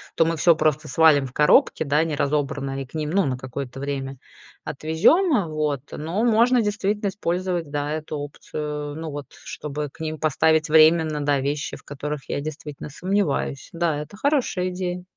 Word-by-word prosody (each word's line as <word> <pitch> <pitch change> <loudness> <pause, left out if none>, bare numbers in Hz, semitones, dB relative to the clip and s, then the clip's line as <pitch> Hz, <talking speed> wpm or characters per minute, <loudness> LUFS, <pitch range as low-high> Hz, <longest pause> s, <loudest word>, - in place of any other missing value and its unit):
то 165 - +4
мы 165 +1 0
всё 170 +2 +5
просто 155 -1 0
свалим 155 -4 +5
в 125 - -12
коробки, 150 +2 +4
да, 150 +1 +2
не 160 -2 -2
разобранное, 140 -1 -1
и - - -5
к 130 - -24
ним, 155 -1 -2
ну, 195 +2 +3
на 130 -2 -1
какое-то 130 0 -6
время 135 -1 -4 0.5
отвезем. 200 - +2
Вот. 150 -3 -1
Но 165 +7 -3
можно 235 +2 +4
действительно 205 0 -1
использовать, 180 -3 -2
да, 145 0 -2
эту 155 -1 -4
опцию, 145 0 -5
ну, 160 0 -5
вот 145 0 -6 0.2
чтобы 150 0 -5
к - - -22
ним 155 -1 -3
поставить 160 +1 +2
временно, 155 -1 +5
да, 145 -1 +2
вещи, 145 +1 -2
в - - -19
которых 145 0 -6
я - - -2
действительно 150 -1 -7
сомневаюсь. 175 -4 -1
Да, 165 -3 0
это 150 +7 -8
хорошая 250 -10 +1
идея. 180 -1 -4
155 Hz, 175 wpm, -23 LUFS, 145-175 Hz, 0.5 s, всё